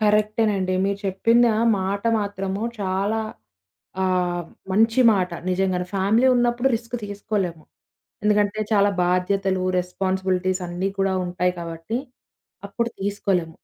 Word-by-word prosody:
కరెక్టేనండి. 210 -2 +2
మీరు 200 0 -1
చెప్పిందా 230 +4 +3 0.3
మాట 200 +2 -2 0.2
మాత్రము 200 0 -3 0.2
చాలా 200 +3 0 0.8
ఆహ్, 180 -1 0 0.3
మంచిమాట 225 -2 +4 0.2
నిజంగానే. 185 -1 0
ఫ్యామిలీ 205 +6 +3
ఉన్నప్పుడు 240 +1 +2
రిస్క్ 230 +1 -10
తీసుకోలేం. 205 -3 -2 0.7
ఎందుకంటే 210 0 +2
చాలా 205 -1 +4
బాధ్యతలు 185 +1 +1 0.2
రెస్పాన్సిబిలిటీస్ 185 0 -1
అన్నీ 175 +2 -2
కూడా 195 0 +2
ఉంటాయి 180 0 0
కాబట్టి 165 +5 -5 0.7
అప్పుడు 235 +4 -2
తీసుకోలేం. 195 -4 -1
195 Hz, 100 wpm, -23 LUFS, 185-210 Hz, 0.8 s, మంచిమాట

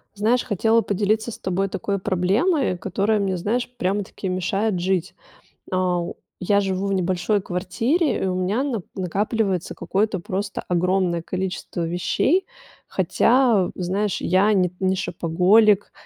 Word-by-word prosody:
Знаешь, 225 +5 +2
хотела 225 +1 +2
поделиться 215 +3 0
с - - -9
тобой 190 +1 -1
такой 200 +2 -2
проблемой, 195 - +1
которая 200 +4 0
мне, 190 -2 -1
знаешь, 230 +8 -1
прямо-таки 195 +1 -2
мешает 185 +2 -1
жить. 180 0 -1 0.6
Ау. 180 -2 -1 0.2
Я 200 +3 +2
живу 190 0 -1
в - - 0
небольшой 190 +2 0
квартире, 225 - 0
и - - +1
у 185 - -1
меня 190 +8 0
нап 235 -10 -3
накапливается 195 0 -1
какое-то 200 0 -1
просто 195 +3 -4
огромное 180 -1 +1
количество 185 -1 -4
вещей. 225 - +1 0.4
Хотя, 235 -6 +3
в - - -9
знаешь, 190 +2 -1
я 190 +4 +3
не 185 -3 +2
не 190 0 +1
шопоголик, 185 +5 +3
195 Hz, 135 wpm, -22 LUFS, 180-215 Hz, 0.6 s, Хотя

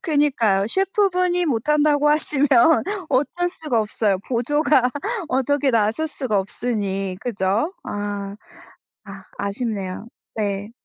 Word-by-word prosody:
그니까요. 260 - +1
셰프 390 - +1
분이 360 -1 +1
못 240 -1 -1
한다고 295 -1 +3
하시면 295 -2 +1 0.6
어쩔 350 +7 0
수가 300 -10 -1
없어요. 210 -2 0
보조가 265 +1 +2 0.4
어떻게 270 +2 +1
나설 225 +8 +1
수가 255 -8 -1
없으니 195 -2 -2
그죠? 225 - -1
아. 205 -1 -4 0.7
아 195 -2 -11
아쉽네요. 200 -1 -3 0.3
네. 205 0 -2
245 Hz, 245 characters per minute, -22 LUFS, 205-295 Hz, 0.7 s, 한다고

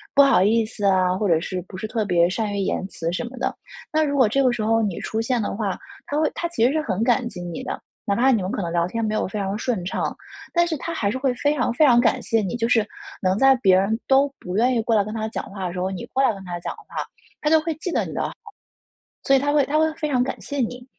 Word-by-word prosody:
不 280 - +8
好 275 -8 +5
意 220 +3 +3
思 215 -1 -5
啊， 185 -2 +3
或 205 +2 0
者 165 -3 +3
是 180 +2 -4
不 185 - -9
是 190 - -4
特 220 0 -1
别 175 -3 +3
善 210 +2 -2
于 - - -2
言 190 -1 -1
辞 165 -3 -3
什 180 - -2
么 250 +2 -9
的。 255 - -1 0.4
那 310 0 +3
如 285 -2 0
果 255 -4 +5
这 275 +6 +1
个 255 - +4
时 240 -3 -2
候 225 +1 +2
你 200 -5 -2
出 220 - -2
现 245 +1 0
的 205 - -3
话， 200 -3 -2 0.3
他 290 - -2
会 310 - +2
他 340 - -2
其 335 -9 +1
实 250 - +4
是 310 +1 0
很 210 -7 -1
感 240 0 +2
激 180 - -7
你 175 -2 -5
的， - - -4 0.3
哪 200 - +1
怕 260 +5 +4
你 225 - +2
们 185 +1 -3
可 225 - -2
能 170 - -3
聊 170 0 +1
天 230 +5 -3
没 215 - -1
有 215 - 0
非 195 - -5
常 195 -1 -2
顺 225 -5 -2
畅， 185 - -2 0.4
但 345 0 +4
是 335 -2 -2
他 335 +5 -5
还 205 -10 0
是 260 - -2
会 260 -1 +1
非 290 +4 +1
常 245 -4 0
非 305 +6 +4
常 240 -4 +6
感 235 -2 +3
谢 225 -1 +1
你， 195 +2 -3
就 230 -1 0
是 225 -3 +3 0.3
能 185 0 +1
在 270 +3 +6
别 190 -6 +4
人 205 +4 +1
都 275 +1 +4
不 180 0 -6
愿 245 +5 +3
意 230 - +2
过 225 0 +1
来 205 - +4
跟 215 +1 -6
他 220 -1 -2
讲 220 - -4
话 195 -2 -4
的 175 - -5
时 180 - -4
候， 185 +1 -1
你 185 - -5
过 270 - +2
来 260 - +3
跟 195 -1 -10
他 175 -1 -5
讲 - - -4
话， - - -15 0.6
他 300 - +1
就 320 0 +6
会 315 0 -3
记 335 +4 -4
得 - - 0
你 - - -7
的 - - -2
好， - - -3 0.9
所 275 - +3
以 - - +4
他 285 +2 0
会 290 -2 +4
他 300 +3 0
会 315 0 +2
非 310 -1 -3
常 255 -3 +2
感 265 - -4
谢 285 - -5
你。 245 0 -2
225 Hz, 325 characters per minute, -23 LUFS, 195-270 Hz, 0.9 s, 不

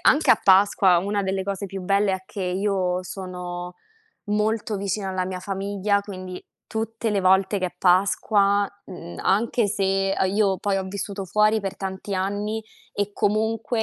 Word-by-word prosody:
anche 300 +4 +4
a - - +6
Pasqua 190 -1 +5
una 200 +2 -1
delle 190 0 -1
cose 200 +1 -3
più 195 0 -6
belle 200 +1 +2
è 190 0 -3
che 200 -1 -6
io 185 -1 0
sono 180 -1 -6 0.5
molto 210 +1 0
vicina 195 0 -2
alla 185 -1 -1
mia 185 -1 -5
famiglia, 200 +1 -1
quindi 185 -2 -8 0.3
tutte 225 0 -2
le 200 -1 +1
volte 190 +2 +3
che 185 - 0
è 180 - -8
Pasqua, 200 +2 +3 0.2
mhmm, 85 - -9
anche 225 +2 +2
se 195 -1 +1
a 190 - +2
io 195 -1 +1
poi 200 +1 0
ho 190 - -1
vissuto 195 +1 -5
fuori 210 +3 +3
per 195 -1 -4
tanti 195 +1 -5
anni 205 +3 -2 0.3
e 205 0 -2
comunque 220 +3 0
195 Hz, 165 wpm, -24 LUFS, 185-205 Hz, 0.5 s, a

